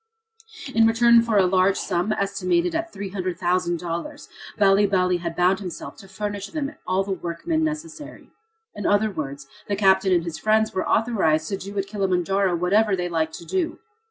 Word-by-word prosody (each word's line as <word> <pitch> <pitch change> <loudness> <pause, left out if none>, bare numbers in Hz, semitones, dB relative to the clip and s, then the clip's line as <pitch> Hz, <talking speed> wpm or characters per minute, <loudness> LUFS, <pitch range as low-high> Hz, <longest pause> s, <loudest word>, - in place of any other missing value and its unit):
In 225 0 +5
return 235 +1 +5
for 230 -2 0
a 190 - +5
large 185 +1 +3
sum, 180 +5 -1
estimated 340 - 0
at 335 +1 -2
$300,000, 180 - -3 0.3
Bali 200 0 +4
Bali 180 -2 +2
had 170 -1 -5
bound 180 +2 +2
himself 180 -5 -7
to 195 - -13
furnish 205 +1 -5
them 300 -2 -4
all 185 +1 +1
the 195 - -5
workmen 190 - -2
necessary. 310 -1 -6 0.4
In - - -3
other 205 +1 +2
words, 140 -5 -6 0.2
the 205 - 0
captain 190 -1 +3
and 175 -2 +3
his 165 -2 -6
friends 215 +3 +2
were 185 - -2
authorized 175 -9 +1
to 195 - -2
do 200 +2 -8
at 195 - 0
Kilimanjaro 195 -2 0
whatever 195 +4 +2
they 180 -1 -3
liked 160 -1 -1
to 170 - -10
do. 345 - -2
195 Hz, 170 wpm, -23 LUFS, 180-220 Hz, 0.4 s, In